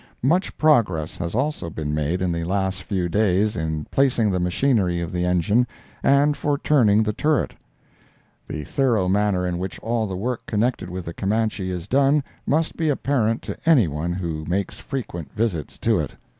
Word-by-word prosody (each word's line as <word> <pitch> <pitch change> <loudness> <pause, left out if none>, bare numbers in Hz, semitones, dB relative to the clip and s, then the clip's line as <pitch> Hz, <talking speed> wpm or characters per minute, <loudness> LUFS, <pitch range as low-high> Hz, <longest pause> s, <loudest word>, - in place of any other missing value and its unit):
Much 175 +9 +1
progress 105 - +2
has 85 +2 -4
also 135 - -1
been 75 -2 -4
made 75 +5 -1
in 90 - +1
the 85 0 -2
last 95 +1 -1
few 95 -2 -1
days 105 +2 +2
in 80 -3 -2
placing 120 -6 +2
the 90 - 0
machinery 90 -1 +1
of 85 -2 -4
the 90 0 -1
engine, 90 +7 +2 0.3
and 145 +2 +4
for 145 -1 0
turning 110 -8 +4
the 105 0 -1
turret. 150 +4 +1 0.9
The 75 - -5
thorough 115 - +1
manner 100 -1 +1
in 90 -1 -2
which 95 -1 -4
all 115 -1 -1
the 95 -2 -4
work 120 +4 -3
connected 110 -3 0
with 90 0 -5
the 85 - -5
Camanche 105 0 -1
is 90 -2 -4
done 140 +2 +3 0.2
must 160 +2 +1
be 160 -2 0
apparent 125 -5 0
to - - -5
anyone 85 - +2
who 85 -4 -3
makes 95 +4 -2
frequent 85 - -5
visits 105 - -2
to - - +2
it. - - -4
100 Hz, 175 wpm, -23 LUFS, 90-125 Hz, 0.9 s, and